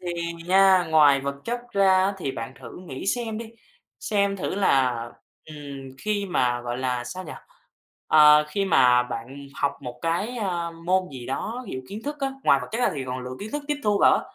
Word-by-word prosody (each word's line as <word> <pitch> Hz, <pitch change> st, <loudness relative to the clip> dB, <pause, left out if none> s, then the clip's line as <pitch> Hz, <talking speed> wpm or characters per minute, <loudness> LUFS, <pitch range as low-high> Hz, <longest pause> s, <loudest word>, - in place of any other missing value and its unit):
thì 175 Hz, -1 st, -4 dB, 0.3 s
nha, 190 Hz, 0 st, +5 dB
ngoài 145 Hz, -3 st, +6 dB
vật 140 Hz, 0 st, -3 dB
chất 240 Hz, +1 st, -2 dB
ra 195 Hz, 0 st, +4 dB
thì 140 Hz, -, -3 dB
bạn 115 Hz, +2 st, -6 dB
thử 130 Hz, -, -10 dB
nghĩ 135 Hz, +7 st, -6 dB
xem 225 Hz, -1 st, -1 dB
đi, 225 Hz, -1 st, -8 dB, 0.5 s
xem 200 Hz, -1 st, 0 dB
thử 185 Hz, -, -3 dB
là, 130 Hz, -11 st, +2 dB, 0.4 s
ừm, 155 Hz, -1 st, -10 dB, 0.4 s
khi 205 Hz, -1 st, -2 dB
mà 125 Hz, -9 st, +1 dB
gọi 120 Hz, +1 st, -4 dB
là 125 Hz, -2 st, -2 dB
sao 185 Hz, +8 st, -7 dB
nhỉ? 155 Hz, -, -8 dB, 0.8 s
À, 150 Hz, 0 st, +7 dB
khi 195 Hz, +6 st, -1 dB
mà 125 Hz, -9 st, +5 dB
bạn 125 Hz, +4 st, -7 dB
học 140 Hz, -, 0 dB
một 125 Hz, -2 st, -7 dB
cái, 185 Hz, +9 st, -1 dB
a, 175 Hz, -6 st, -2 dB
môn 180 Hz, +3 st, -1 dB
gì 125 Hz, -2 st, -8 dB
đó 225 Hz, -, -4 dB
ví -, -, -7 dB
dụ 130 Hz, -, -4 dB
kiến 210 Hz, +3 st, -7 dB
thức 295 Hz, +1 st, -4 dB
á, 270 Hz, -, 0 dB
ngoài 140 Hz, -, +5 dB
vật 125 Hz, -, -7 dB
chất 225 Hz, -, -2 dB
ra 245 Hz, -, +3 dB
thì 135 Hz, -3 st, -4 dB
còn 125 Hz, 0 st, -4 dB
lượng 125 Hz, 0 st, -6 dB
kiến 210 Hz, +2 st, -7 dB
thức 295 Hz, 0 st, -3 dB
tiếp 295 Hz, -, 0 dB
thu 205 Hz, -1 st, +2 dB
vào -, -, +6 dB
á, -, -, -2 dB
170 Hz, 215 wpm, -25 LUFS, 130-200 Hz, 0.8 s, À